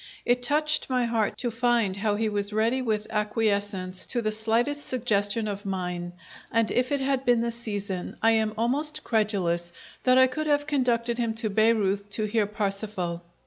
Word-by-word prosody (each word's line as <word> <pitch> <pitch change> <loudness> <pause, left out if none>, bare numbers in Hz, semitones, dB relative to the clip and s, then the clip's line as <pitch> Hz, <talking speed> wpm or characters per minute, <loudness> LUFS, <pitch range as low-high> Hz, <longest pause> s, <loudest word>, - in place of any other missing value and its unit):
It 245 +1 +2
touched 300 +4 +1
my 250 -1 +1
heart 225 -3 0
to 240 -2 -2
find 230 -4 +1
how 205 0 0
he 220 +1 0
was 205 -1 -1
ready 225 +5 +1
with 215 -4 -1
acquiescence 205 -3 -1
to 245 - +1
the 215 - +1
slightest 230 +7 +1
suggestion 215 -3 0
of 200 -1 -4
mine, 180 -3 -4 0.4
and, 230 -1 +2
if 250 +2 +1
it 285 -1 +1
had 270 -1 0
been 245 -3 +3
the 235 0 -1
season, 205 -5 -5
I 225 - +4
am 220 -1 +1
almost 295 +7 -1
credulous 185 -6 0 0.3
that 255 0 +4
I 260 - +8
could 305 +4 -3
have 290 -1 +2
conducted 245 -5 0
him 230 -2 -1
to 220 -2 0
Baireuth 205 -2 +2
to 215 - 0
hear 210 -1 +1
Parsifal! 200 -4 -3
220 Hz, 180 wpm, -26 LUFS, 205-245 Hz, 0.4 s, I